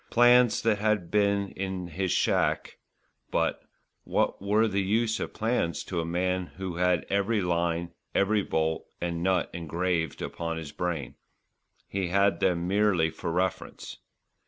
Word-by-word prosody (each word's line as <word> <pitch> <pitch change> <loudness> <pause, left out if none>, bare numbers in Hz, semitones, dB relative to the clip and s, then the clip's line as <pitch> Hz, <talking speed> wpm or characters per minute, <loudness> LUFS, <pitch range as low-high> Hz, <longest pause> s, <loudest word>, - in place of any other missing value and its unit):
Plans 120 0 +5
there 110 -2 +3
had 105 -4 0
been 100 -1 +2
in 95 -2 -4
his 90 +2 -2
shack; - - +1 0.5
but - - 0 0.4
what - - 0
were 105 +3 +3
the 100 -1 0
use 110 +3 +1
of - - -3
plans 110 -7 0
to 85 -3 -2
a - - -4
man 90 +1 -1
who 95 -2 -4
had 90 -1 +2
every 100 +3 +1
line, 85 -2 0 0.2
every 105 +2 +3
bolt 80 -3 -1
and 85 -1 -2
nut 95 0 +1
engraved 85 -1 -2
upon 85 -1 -4
his 80 -3 -6
brain. 80 -5 -3 0.7
He 95 -2 -2
had 100 +2 +2
them 90 -2 +1
merely 95 -5 +2
for 85 - -4
reference. 90 +2 -3
95 Hz, 145 wpm, -28 LUFS, 85-100 Hz, 0.7 s, Plans